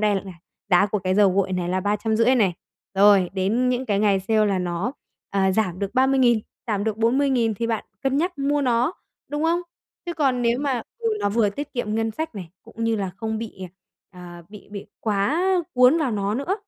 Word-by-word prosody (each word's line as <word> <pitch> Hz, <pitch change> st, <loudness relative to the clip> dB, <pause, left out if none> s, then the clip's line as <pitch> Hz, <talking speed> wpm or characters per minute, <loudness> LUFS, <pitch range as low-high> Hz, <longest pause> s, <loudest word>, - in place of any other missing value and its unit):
nay 210 Hz, -1 st, +2 dB
là 195 Hz, -1 st, -4 dB, 0.4 s
giá 180 Hz, +3 st, +5 dB
của 210 Hz, +1 st, -1 dB
cái 185 Hz, 0 st, -1 dB
dầu 200 Hz, -1 st, +5 dB
gội 190 Hz, 0 st, 0 dB
này 180 Hz, -1 st, -2 dB
là 185 Hz, +1 st, 0 dB
350.000 220 Hz, +5 st, +2 dB
này, 200 Hz, -7 st, +2 dB, 0.4 s
rồi 195 Hz, -2 st, +5 dB
đến 210 Hz, +7 st, +1 dB
những 250 Hz, +1 st, -1 dB
cái 200 Hz, -1 st, +1 dB
ngày 200 Hz, -2 st, +2 dB
sale 215 Hz, +2 st, +2 dB
là 195 Hz, -2 st, +1 dB
nó, 180 Hz, +6 st, -2 dB, 0.4 s
ờ, 195 Hz, -1 st, +2 dB
giảm 185 Hz, -4 st, 0 dB
được 200 Hz, +3 st, -4 dB
30.000, 260 Hz, -3 st, +4 dB, 0.3 s
giảm 205 Hz, -3 st, -1 dB
được 220 Hz, -1 st, -1 dB
40.000 240 Hz, -1 st, +2 dB
thì 230 Hz, +3 st, -2 dB
bạn 225 Hz, -2 st, -2 dB, 0.2 s
cân 270 Hz, 0 st, +1 dB
nhắc 345 Hz, +1 st, -1 dB
mua 285 Hz, +1 st, +1 dB
nó, 245 Hz, +4 st, +1 dB, 0.4 s
đúng 295 Hz, +1 st, -3 dB
không? 340 Hz, +2 st, +2 dB, 0.5 s
Chứ 345 Hz, -, -3 dB
còn 270 Hz, -6 st, +1 dB
nếu 235 Hz, +1 st, +2 dB
mà 265 Hz, -5 st, -1 dB, 0.2 s
ừ, 460 Hz, -1 st, -1 dB
nó -, -, +1 dB
vừa 210 Hz, 0 st, +2 dB
tiết 285 Hz, +9 st, -6 dB
kiệm 220 Hz, -4 st, -2 dB
ngân 225 Hz, 0 st, 0 dB
sách 315 Hz, +4 st, -5 dB
này, 180 Hz, -5 st, -8 dB
cũng 230 Hz, 0 st, -6 dB
như 225 Hz, -1 st, +1 dB
là 195 Hz, -2 st, -2 dB
không 220 Hz, +1 st, -3 dB
bị, 225 Hz, -1 st, -6 dB
ờ, 185 Hz, -, -6 dB, 0.7 s
ờ, 170 Hz, -, -12 dB
bị 210 Hz, -1 st, -13 dB
bị 200 Hz, -1 st, -7 dB
quá 215 Hz, -, 0 dB, 0.3 s
cuốn 255 Hz, +6 st, +5 dB
vào 280 Hz, -6 st, 0 dB
nó 205 Hz, 0 st, -1 dB
nữa. 280 Hz, +9 st, -1 dB
220 Hz, 215 wpm, -23 LUFS, 200-255 Hz, 0.7 s, giá